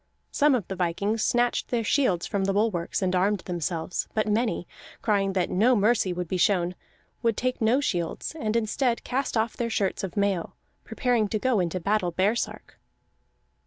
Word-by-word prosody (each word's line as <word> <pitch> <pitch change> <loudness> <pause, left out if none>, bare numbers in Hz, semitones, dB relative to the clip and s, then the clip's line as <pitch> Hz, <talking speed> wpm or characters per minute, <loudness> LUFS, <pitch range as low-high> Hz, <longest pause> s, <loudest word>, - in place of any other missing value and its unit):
Some 295 -2 +4
of 215 -8 -2
the 190 - -4
vikings 200 +5 -1
snatched 240 0 +1
their 235 -2 -1
shields 205 -8 +1
from 195 -1 -1
the 195 - +1
bulwarks 200 -4 0
and 185 0 +1
armed 195 +2 +2
themselves; 175 -1 -3
but 215 0 +1
many, 215 -4 0 0.4
crying 200 -3 +1
that 185 -2 0
no 235 +7 +4
mercy 210 -2 +2
would 180 0 -3
be 185 - -1
shown, 180 -1 +2 0.5
would 230 -2 +1
take 255 -1 -1
no 225 +4 +3
shields, 175 - -2
and 215 -5 -1
instead 230 +2 0
cast 260 -1 -1
off 220 +1 0
their 235 -1 -2
shirts 200 -4 -1
of 195 +1 -5
mail, 200 -4 0 0.3
preparing 245 -5 0
to 215 - -1
go 245 0 +1
into 180 0 -1
battle 195 0 0
baresark. 200 +7 -1
205 Hz, 175 wpm, -26 LUFS, 185-230 Hz, 0.5 s, Some